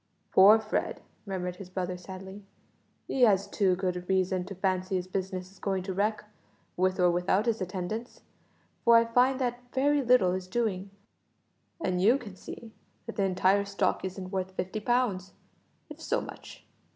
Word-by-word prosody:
"Poor 200 +3 +8
Fred!" 220 -1 -2 0.3
murmured 180 -2 -3
his 190 -1 -10
brother 185 -1 -3
sadly; 190 +2 -9 0.6
"he 265 - -2
has 200 -5 +5
too 190 -3 +1
good 180 -1 -3
reason 185 -1 +1
to 195 +1 -8
fancy 185 0 -1
his 180 -1 -1
business 185 0 -4
is 195 - -20
going 190 -2 -1
to 190 0 -4
wreck, 210 +2 0 0.5
with 185 +1 +1
or 180 -1 +5
without 180 +4 +1
his 225 -3 0
attendance, 185 +6 -5 0.6
for 235 0 +6
I 230 - +4
find 250 +3 +3
that 245 -2 -1
very 285 +2 +2
little 245 -7 +4
is 185 0 -3
doing, 200 -2 -1 0.9
and 180 - -1
you 230 +7 +5
can 215 -8 -10
see 225 +4 -10 0.3
that 230 - -7
the 200 - +1
entire 190 +2 +3
stock 200 -1 -1
isn't 185 0 -5
worth 190 -1 -3
fifty 190 +4 -3
pounds 210 -5 0 0.5
if - - -11
so - - 0
much. - - -10
190 Hz, 165 wpm, -29 LUFS, 185-220 Hz, 0.9 s, Poor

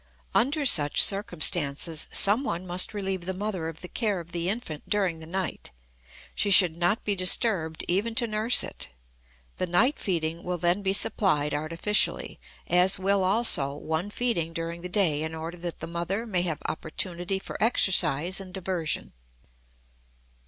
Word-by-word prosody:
Under 285 +5 +1
such 150 - +3
circumstances 165 -5 +1
someone 200 -4 +2
must 180 0 +2
relieve 190 -3 -3
the 190 - -3
mother 190 -4 -3
of 160 -1 -8
the 180 - -7
care 210 -1 -1
of 170 0 -11
the 170 +1 -2
infant 195 -9 -5
during 190 -6 0
the 160 - -10
night; 185 +1 -4 0.6
she 205 - -1
should 180 -4 +5
not 175 +5 0
be 205 - -1
disturbed 185 -3 +1
even 210 +6 0
to 235 - +2
nurse 220 +2 +2
it. - - -4 0.7
The 185 - -2
night 230 - +2
feeding 165 -3 -2
will 180 0 -3
then 175 +3 +1
be 190 -1 0
supplied 155 -7 +2
artificially; 165 +7 0 0.3
as 180 +3 +3
will 195 0 +1
also 185 -9 +2
one 160 +6 -3
feeding 205 -8 -1
during 165 +1 -5
the 180 - -6
day 175 -6 +1
in 160 +1 -4
order 165 +2 -6
that 175 -1 -7
the - - -4
mother 175 +6 -3
may 190 -6 0
have 165 -4 -4
opportunity 175 +4 -2
for 190 - -8
exercise 185 - +2
and 185 -1 -10
diversion. 180 -4 -3
180 Hz, 160 wpm, -26 LUFS, 165-200 Hz, 0.7 s, should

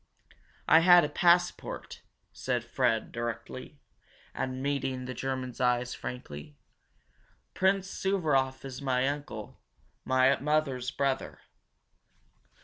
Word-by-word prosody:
"I 160 - +8
had 175 +1 +7
a - - -3
passport," 175 +3 +1 0.3
said - - -2
Fred 110 -1 0
directly, 120 0 -5 0.6
and 130 0 -3
meeting 135 -2 -1
the 130 - -5
German's 130 0 -4
eyes 125 0 +1
frankly. 75 -12 -8 1.0
"Prince 190 0 +2
Suvaroff 150 -11 0
is 130 0 -7
my 130 -1 +1
uncle, 145 +1 -5 0.4
my 130 +1 +3
mother's 140 -4 0
brother. 135 0 -2
135 Hz, 100 wpm, -29 LUFS, 125-150 Hz, 1.0 s, I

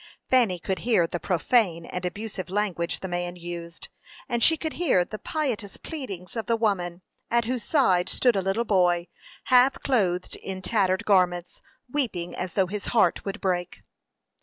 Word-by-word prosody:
Fanny 235 -8 +4
could 190 +2 -3
hear 225 -8 +3
the 170 +1 -4
profane 180 -1 +1
and 180 +1 -5
abusive 200 -1 -6
language 190 -4 -1
the 190 - -4
man 175 0 -3
used, 170 -1 -8 0.4
and 235 0 -1
she 320 +7 +5
could 315 0 -4
hear 190 - +3
the 215 - -7
piteous 245 -10 -3
pleadings 220 - -7
of 225 -3 -3
the 230 - +3
woman, 185 -5 -1 0.3
at 235 -1 +2
whose 245 -1 -2
side 190 - +3
stood 245 -3 +2
a 195 - +2
little 195 +5 0
boy, 180 -4 +2 0.4
half 255 +1 +5
clothed 185 -9 +1
in 190 -1 -6
tattered 195 0 +1
garments, 180 -3 +2 0.3
weeping 235 -11 -2
as 180 0 -4
though 190 - +3
his 200 +2 -5
heart 180 -6 +3
would 200 +3 -4
break. 180 -2 -2
195 Hz, 165 wpm, -26 LUFS, 175-230 Hz, 0.4 s, she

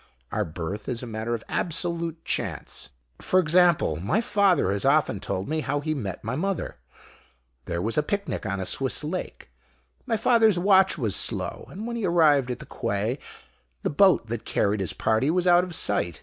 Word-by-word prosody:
Our 105 -1 -1
birth 85 +7 -5
is 125 -1 -3
a - - -4
matter 115 +1 -3
of 110 - -8
absolute 170 -1 -2
chance. - - -3 0.3
For 185 - +2
example, 170 - +3
my 100 - 0
father 200 - +2
has 100 0 -1
often 140 -7 +2
told 95 +1 -4
me 155 +1 -1
how 145 -1 -1
he 155 +2 -2
met 105 -10 -5
my 115 +4 -3
mother. 190 +4 -3 0.9
There 85 0 -3
was 115 +7 0
a - - +4
picnic 200 +6 -3
on 100 -1 -2
a 95 - -3
Swiss 135 +8 0
lake. 170 +5 -5 0.6
My 230 -3 +1
father's 225 -3 +4
watch 190 0 +4
was 110 - 0
slow, - - -1
and 205 +5 -7
when 235 0 -4
he 225 - -2
arrived 150 -6 +4
at 125 - -3
the - - -10
quay 115 +4 -2 0.6
the - - 0
boat 180 -2 +4
that 115 0 -5
carried 105 +1 0
his 95 - -1
party 110 +6 +1
was 180 +2 +1
out 175 0 +5
of 180 -2 -6
sight. 85 - 0
150 Hz, 190 wpm, -25 LUFS, 110-180 Hz, 0.9 s, out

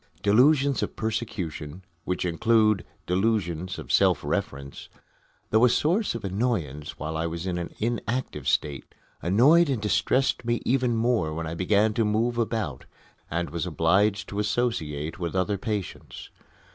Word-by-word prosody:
Delusions 135 +6 +4
of - - -3
persecution 95 -7 -4 0.2
which 90 0 -1
include 110 +3 +3 0.2
"delusions 90 -3 0
of - - -7
self - - +3
reference" 70 0 -4 0.6
though 110 +2 +4
a 125 - +7
source 170 - +1
of 115 -3 -5
annoyance 90 - -2
while 80 +1 -4
I 80 +1 -1
was 85 +1 -5
in 90 -2 -2
an 85 - -5
inactive 120 - -2
state, 70 -3 -1 0.3
annoyed 140 - +5
and 130 -4 0
distressed 115 +7 +1
me 120 0 0
even 125 -2 +2
more 110 -9 +1
when 80 0 -3
I 80 - -4
began 105 +5 +2
to 115 - +1
move 115 +3 0
about 110 - -2 0.4
and 85 +2 -2
was 85 +1 -3
obliged 95 +6 +2
to 100 - -4
associate 80 -10 -1
with 85 0 -3
other 95 +2 0
patients. 105 -2 -5
105 Hz, 145 wpm, -26 LUFS, 85-115 Hz, 0.6 s, a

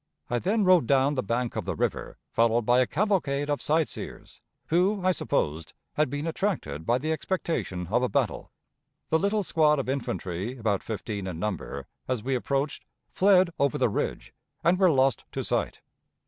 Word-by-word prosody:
I 120 - +1
then 210 - +1
rode 185 -9 +5
down 135 +1 +3
the 130 - 0
bank 120 +2 -2
of - - -3
the - - -2
river, - - -2
followed 115 +1 +3
by 120 +3 +4
a 130 - +3
cavalcade 150 -7 0
of 145 - -1
sight 155 +1 +2
seers, - - -9 0.3
who, 185 +5 +3
I 185 - +5
supposed, 80 - -1 0.2
had 150 -2 +1
been 145 +3 -3
attracted 160 - -2
by 120 - +3
the 155 +5 -2
expectation 160 - -2
of 120 - +3
a 125 - +1
battle. - - -1 0.6
The 160 - +3
little 200 +2 +1
squad 155 -4 +3
of 135 - -2
infantry, 105 -4 -3
about 110 -4 0
fifteen 105 -3 -4
in 90 -3 -5
number, 95 0 -4 0.2
as 125 -4 -1
we 135 +2 -1
approached, 135 +3 -1 0.3
fled 185 -2 +4
over 140 -2 +2
the - - +2
ridge, - - -3 0.3
and 175 +3 +3
were 190 -2 +6
lost 135 -5 +2
to - - -2
sight. - - -1
135 Hz, 180 wpm, -27 LUFS, 115-165 Hz, 0.6 s, were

